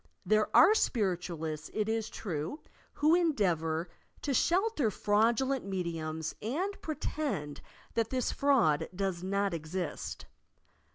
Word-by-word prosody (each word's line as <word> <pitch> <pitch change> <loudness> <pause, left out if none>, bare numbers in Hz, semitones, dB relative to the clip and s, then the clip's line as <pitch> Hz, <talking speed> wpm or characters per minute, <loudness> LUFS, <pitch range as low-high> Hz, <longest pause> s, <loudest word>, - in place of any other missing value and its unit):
There 215 +3 +3
are 365 +6 +8
Spiritualists, 175 - -1
it 215 -1 0
is 225 0 -1
true, 175 - -4 0.3
who 305 +2 +3
endeavour 180 - +1 0.4
to 280 - 0
shelter 345 - +2
fraudulent 230 +6 +2
mediums 165 -4 -3
and 350 - -2
pre 310 - -3
tend 150 - -3 0.3
that 225 -1 0
this 255 -2 0
fraud 250 - +3
does 190 -2 -1
not 200 +1 0
exist. 170 +3 -4
205 Hz, 115 wpm, -31 LUFS, 170-270 Hz, 0.4 s, are